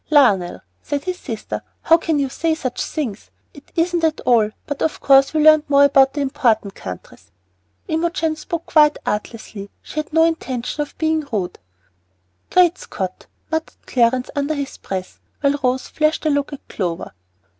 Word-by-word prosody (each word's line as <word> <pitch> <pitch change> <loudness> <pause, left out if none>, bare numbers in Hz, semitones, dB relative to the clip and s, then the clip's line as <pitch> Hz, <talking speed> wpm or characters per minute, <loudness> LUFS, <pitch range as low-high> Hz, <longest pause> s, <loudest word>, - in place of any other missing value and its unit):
"Lionel," 220 - +3 0.2
said 285 -1 -3
his 365 -1 -4
sister, 225 -5 -5 0.2
"how 330 - +6
can 325 -2 -1
you 280 -1 +1
say 320 +4 -1
such 260 -6 -3
things? 240 -10 -4 0.2
It 285 - -16
isn't 345 +1 +1
so 325 - +4
at 315 - -3
all; 230 -4 +3 0.2
but 290 -1 -5
of 320 - 0
course 275 0 +5
we 310 -1 +1
learned 310 0 +7
more 280 0 +6
about 270 -1 +5
the 290 - -2
important 225 -7 +1
countries." 90 - -10 0.6
Imogen 325 0 0
spoke 335 +1 -5
quite 300 -1 +4
artlessly; 210 -1 -4
she 310 - -5
had 305 - -5
no 325 +1 +4
intention 295 -5 -1
of 295 - -6
being 315 -1 +1
rude. 195 -5 -2 0.9
"Great 360 -1 +4
Scott!" 185 -2 -6 0.2
muttered 320 0 -2
Clarence 250 0 +1
under 290 +2 0
his 280 -2 -4
breath, 185 -1 -6 0.2
while 285 0 +2
Rose 255 +1 0
flashed 305 +1 0
a 310 - +3
look 285 0 0
at 285 - -10
Clover. 175 -4 -3
285 Hz, 170 wpm, -20 LUFS, 240-315 Hz, 0.9 s, learned